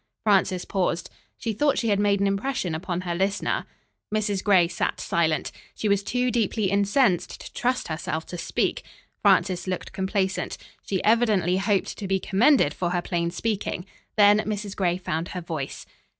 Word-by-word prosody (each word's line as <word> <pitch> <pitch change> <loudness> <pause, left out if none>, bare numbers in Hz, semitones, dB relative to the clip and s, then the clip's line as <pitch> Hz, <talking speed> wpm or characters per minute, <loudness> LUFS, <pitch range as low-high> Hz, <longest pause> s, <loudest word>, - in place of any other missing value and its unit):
Frances 190 -3 +2
paused. 180 -3 -1 0.3
She 225 - -2
thought 285 +6 +2
she 230 - 0
had 200 -1 +2
made 205 -1 +2
an - - +3
impression 195 -2 -1
upon 175 +2 -3
her 175 -1 -3
listener. 195 +3 -1 0.4
Mrs. 210 -2 0
Gray 185 -5 +5
sat - - -2
silent. 160 -3 0 0.2
She 215 - -2
was 200 -1 +3
too 250 +4 0
deeply 215 -4 0
incensed 200 -2 +2
to - - -10
trust 250 +1 0
herself 160 0 -3
to 175 - -7
speak. - - -1 0.4
Frances 185 -1 +3
looked 185 -1 -3
complacent. 190 0 -1 0.3
She 190 -2 -1
evidently 210 -6 +3
hoped 195 0 0
to 200 - -4
be 190 0 +1
commended 200 - +3
for 175 - -2
her 175 0 0
plain 170 -1 -1
speaking. 195 -1 -2 0.3
Then 205 0 +6
Mrs. 210 -2 -3
Gray 180 -2 +1
found 165 -2 -3
her 180 - -5
voice. 160 -5 -5
195 Hz, 165 wpm, -25 LUFS, 175-210 Hz, 0.4 s, Then